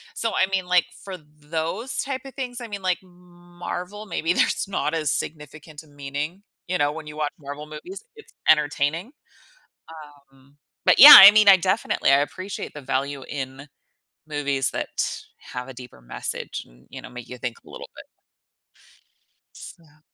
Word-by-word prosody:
So, 230 Hz, -, -2 dB
I -, -, +2 dB
mean, 190 Hz, -2 st, -1 dB
like, 180 Hz, -1 st, +3 dB, 0.2 s
for 190 Hz, -2 st, -7 dB
those 160 Hz, -, -6 dB
type 265 Hz, -1 st, -3 dB
of 270 Hz, -, -10 dB
things, 250 Hz, -2 st, -5 dB
I 235 Hz, -, -7 dB
mean, 200 Hz, -2 st, -7 dB
like 185 Hz, -1 st, 0 dB
Marvel, 180 Hz, +2 st, -9 dB
maybe 170 Hz, -1 st, -1 dB
there's -, -, 0 dB
not 165 Hz, -5 st, -2 dB
as 155 Hz, -3 st, -1 dB
significant 150 Hz, 0 st, -7 dB
a -, -, -22 dB
meaning, 145 Hz, +6 st, -6 dB, 0.2 s
you 180 Hz, 0 st, -1 dB
know, 145 Hz, 0 st, +1 dB
when 155 Hz, 0 st, -9 dB
you 150 Hz, 0 st, -10 dB
watch 150 Hz, -1 st, -2 dB
Marvel 145 Hz, +1 st, -9 dB
movies, 360 Hz, -, -10 dB
it's 440 Hz, -, -17 dB, 0.2 s
entertaining, 150 Hz, -, +1 dB, 1.2 s
um, 135 Hz, +2 st, -25 dB, 0.3 s
but -, -, +4 dB
yeah, 290 Hz, +3 st, +13 dB
I 200 Hz, +1 st, +12 dB
mean, 215 Hz, -1 st, +4 dB
I 190 Hz, -, +8 dB
definitely, 190 Hz, -5 st, 0 dB
I 140 Hz, -, +5 dB
appreciate 185 Hz, +6 st, -6 dB
the 150 Hz, -, -8 dB
value 135 Hz, +1 st, -3 dB
in 135 Hz, 0 st, -7 dB, 0.6 s
movies 140 Hz, -3 st, -1 dB
that -, -, -4 dB, 0.6 s
have 125 Hz, +1 st, -6 dB
a -, -, -8 dB
deeper 125 Hz, -, -13 dB
message -, -, -6 dB
and, -, -, -23 dB
you -, -, -9 dB
know, -, -, -10 dB
make 125 Hz, -1 st, -10 dB
you 125 Hz, -, -9 dB
think 120 Hz, -1 st, -5 dB
a -, -, -16 dB
little -, -, -10 dB
bit. -, -, -11 dB, 1.5 s
So 155 Hz, -2 st, -14 dB
155 Hz, 170 wpm, -23 LUFS, 145-185 Hz, 1.5 s, yeah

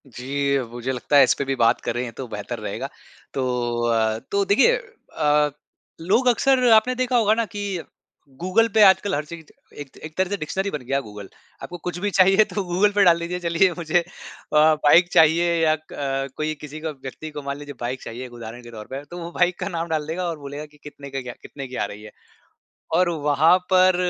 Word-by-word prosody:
जी, 140 Hz, +3 st, -1 dB
मुझे 120 Hz, +2 st, -4 dB
लगता 130 Hz, +3 st, +1 dB
है 140 Hz, -, +9 dB
इस 130 Hz, -, +4 dB
पे 140 Hz, -, -1 dB
भी 135 Hz, 0 st, -1 dB
बात 115 Hz, -1 st, +2 dB
करें 120 Hz, 0 st, -3 dB
तो 130 Hz, +2 st, -7 dB
बेहतर 110 Hz, +2 st, -6 dB
रहेगा। 105 Hz, -2 st, -4 dB, 0.5 s
तो 130 Hz, -, -1 dB, 0.4 s
अ 110 Hz, -1 st, +1 dB
तो 200 Hz, 0 st, +2 dB
देखिए 240 Hz, -, +4 dB
अ, 150 Hz, -, -1 dB, 0.5 s
लोग 200 Hz, +9 st, +2 dB
अक्सर 255 Hz, +1 st, +3 dB
आपने 220 Hz, +4 st, +4 dB
देखा 250 Hz, 0 st, +1 dB
होगा 215 Hz, -2 st, +4 dB
ना 230 Hz, +1 st, 0 dB
कि 205 Hz, -4 st, -4 dB, 0.6 s
गूगल 190 Hz, +6 st, +3 dB
पे 220 Hz, -, +4 dB
आजकल 190 Hz, 0 st, +4 dB
हर 150 Hz, +1 st, -3 dB
चीज़ 160 Hz, +1 st, -10 dB, 0.4 s
एक 145 Hz, -, -9 dB
त -, -, -15 dB
एक 155 Hz, 0 st, -10 dB
तरह 185 Hz, -1 st, +1 dB
से 205 Hz, -, -2 dB
डिक्शनरी 190 Hz, +5 st, -3 dB
बन 150 Hz, -, -4 dB
गया 135 Hz, +2 st, 0 dB
है -, -, -1 dB
गूगल। 105 Hz, -2 st, -10 dB, 0.3 s
आपको 175 Hz, -, -7 dB
कुछ 175 Hz, -1 st, -3 dB
भी 205 Hz, +3 st, -1 dB
चाहिए 195 Hz, +3 st, +6 dB
तो 205 Hz, -, -1 dB
गूगल 185 Hz, +3 st, +2 dB
पे 200 Hz, -, +6 dB
डाल 170 Hz, -2 st, +5 dB
दीजिए 175 Hz, +1 st, -4 dB
चलिए 175 Hz, +2 st, +2 dB
मुझे 170 Hz, 0 st, +1 dB
अ, -, -, -3 dB, 0.5 s
बाइक 155 Hz, +2 st, +5 dB
चाहिए 165 Hz, +2 st, +4 dB
या 155 Hz, -1 st, +4 dB, 0.2 s
क 135 Hz, -1 st, -3 dB
कोई 155 Hz, 0 st, -1 dB
किसी 150 Hz, +1 st, -8 dB
का 160 Hz, +1 st, -4 dB
व्यक्ति 135 Hz, +4 st, -7 dB
को -, -, -3 dB
मान 140 Hz, 0 st, -4 dB
लीजिए 145 Hz, 0 st, -9 dB
बाइक 125 Hz, +2 st, -4 dB
चाहिए 120 Hz, +3 st, -7 dB
एक 125 Hz, -, -12 dB
उदाहरण 120 Hz, 0 st, -9 dB
के 120 Hz, -, -12 dB
तौर 110 Hz, -2 st, -9 dB
पर 135 Hz, +2 st, -6 dB
तो 175 Hz, -, -7 dB
वो 170 Hz, 0 st, -7 dB
बाइक 175 Hz, 0 st, +1 dB
का -, -, -3 dB
नाम 170 Hz, -2 st, -3 dB
डाल 155 Hz, -2 st, -1 dB
देगा 175 Hz, +3 st, -3 dB
और 165 Hz, -, -4 dB
बोलेगा 145 Hz, +1 st, -7 dB
कि -, -, -19 dB
कितने 145 Hz, -1 st, -10 dB
का 135 Hz, 0 st, -4 dB
क्या 125 Hz, -1 st, -7 dB
कितने 140 Hz, -2 st, -8 dB
की 130 Hz, -, -9 dB
आ -, -, -1 dB
रही 105 Hz, +1 st, -9 dB
है। 105 Hz, -, -11 dB, 0.8 s
और 180 Hz, +1 st, +3 dB
वहाँ 155 Hz, +1 st, +3 dB, 0.2 s
पर 185 Hz, 0 st, +5 dB
155 Hz, 225 wpm, -23 LUFS, 135-185 Hz, 0.8 s, है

